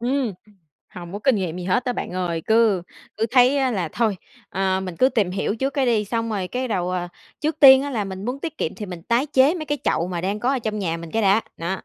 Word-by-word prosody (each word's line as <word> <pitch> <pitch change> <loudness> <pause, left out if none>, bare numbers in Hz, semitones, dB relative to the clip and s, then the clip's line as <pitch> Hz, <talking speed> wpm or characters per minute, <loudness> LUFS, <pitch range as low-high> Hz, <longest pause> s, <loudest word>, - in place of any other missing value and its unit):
Ừm, 250 -1 0 0.6
hông 175 0 -8
có 205 - -4
kinh 255 0 +2
nghiệm 180 -3 -3
gì 180 - -5
hết 235 +7 +1
á 250 - 0
bạn - - -5
ơi. 175 -3 -2
Cứ 220 -5 +3 0.3
cứ 220 +2 0
thấy 260 +1 +4
là 185 -6 -2
thôi, 220 -4 0 0.3
ờ, 190 0 0
mình 185 -3 -6
cứ 260 - +4
tìm 210 -8 0
hiểu 195 +2 -1
trước 270 +3 -1
cái 270 -3 +1
đi, 220 -3 +2
xong 230 +2 -2
rồi 195 -4 -2
cái 255 +3 -3
đầu, 180 -4 -1
à, 180 -1 -2 0.3
trước 310 0 -1
tiên 265 -2 +9
á 285 - -4
là 220 -6 -1
mình 190 0 -7
muốn 255 +3 -3
tiết 325 0 -6
kiệm - - -2
thì 210 - -7
mình 180 -2 -8
tái 235 - +1
chế 275 +2 +4
mấy 325 -4 -4
cái 290 0 -1
chậu 170 - +1
mà 175 -2 -3
đang 200 +4 -2
có 245 - +1
ở 270 - 0
trong 215 -3 -3
nhà 170 -5 -1
mình 170 -1 -9
cái 225 - 0
đã, 200 +2 +4 0.2
nó. 175 +3 -3
215 Hz, 270 wpm, -22 LUFS, 185-255 Hz, 0.6 s, tiên